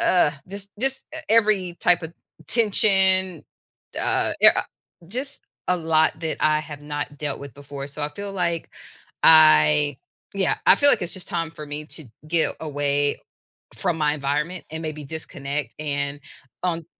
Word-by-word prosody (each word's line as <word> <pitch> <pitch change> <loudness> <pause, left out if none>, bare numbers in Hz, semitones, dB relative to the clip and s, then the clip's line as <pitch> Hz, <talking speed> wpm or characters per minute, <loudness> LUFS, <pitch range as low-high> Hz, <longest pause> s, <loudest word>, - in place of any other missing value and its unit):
ugh, 175 -5 +3 0.2
just 200 +1 -4
just 270 +1 0
e - - -5
every 210 -6 +2
type 175 0 +3
of 160 +1 -8 0.3
tension, 190 -4 +4 0.6
uh, - - 0
i - - +9
a - - +2 0.5
just 260 +7 -5 0.3
a 180 - +2
lot 160 -1 +1
that 160 -1 -3
I 155 0 +2
have 150 -1 -9
not 145 0 -5
dealt 145 -2 -3
with 140 -2 -9
before, 140 0 -8
so, 145 +2 -7
I 145 - -1
feel 200 +5 -7
like 170 -3 -2 0.6
I 145 - +6 0.4
Yeah, - - +1
I - - +7
feel 285 - +5
like - - +3
it's 175 - -2
just 185 -2 -5
time 165 -1 -3
for 150 - -9
me 150 +1 -6
to 160 - -10 0.2
get 165 0 +2
away 145 -1 -1 0.6
from 175 -4 -1
my 150 -2 +1
environment 150 +5 -3
and 160 0 -6
maybe 155 -1 -5
disconnect, 145 -1 -5
and 145 -1 -3 0.4
on 170 -3 -2
160 Hz, 160 wpm, -23 LUFS, 145-180 Hz, 0.6 s, i